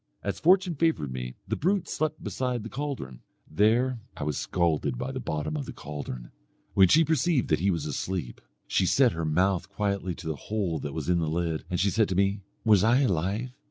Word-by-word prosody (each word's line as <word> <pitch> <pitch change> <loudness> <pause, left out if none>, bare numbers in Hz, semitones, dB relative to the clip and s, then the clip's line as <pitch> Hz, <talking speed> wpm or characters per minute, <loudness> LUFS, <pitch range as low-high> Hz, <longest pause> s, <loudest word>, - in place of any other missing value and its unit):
As 100 - -3
fortune 180 +1 +4
favoured 155 - 0
me, 60 0 -5
the - - -1
brute 190 +3 +1
slept 155 0 -2
beside 125 -3 -2
the 115 - -6
caldron. 130 - -5 0.3
There 115 +8 +2 0.2
I - - -4
was 75 -1 -1
scalded 80 -7 0
by - - -3
the - - -4
bottom 75 0 -3
of 75 - -4
the - - -6
caldron. 70 -5 -7 0.4
When 95 -1 +6
she 160 - +5
perceived 155 -2 +1
that 75 - +3
he 95 +4 +2
was 85 -5 -1
asleep, 75 -3 -3 0.2
she 95 - +1
set 130 +2 +4
her 80 -2 -3
mouth 90 +4 +1
quietly 100 -3 -2
to 95 - -11
the 80 -1 -2
hole 95 -7 -1
that 70 0 -5
was 80 -3 -4
in 90 -1 +3
the 80 -2 0
lid, 80 -1 -1
and 90 -2 -1
she 100 +1 +2
said 110 +1 +2
to 95 - -1
me 100 +1 +1 0.2
'was 105 -4 +5
I 120 +5 +4
alive?' 100 - 0
95 Hz, 210 wpm, -27 LUFS, 80-120 Hz, 0.4 s, When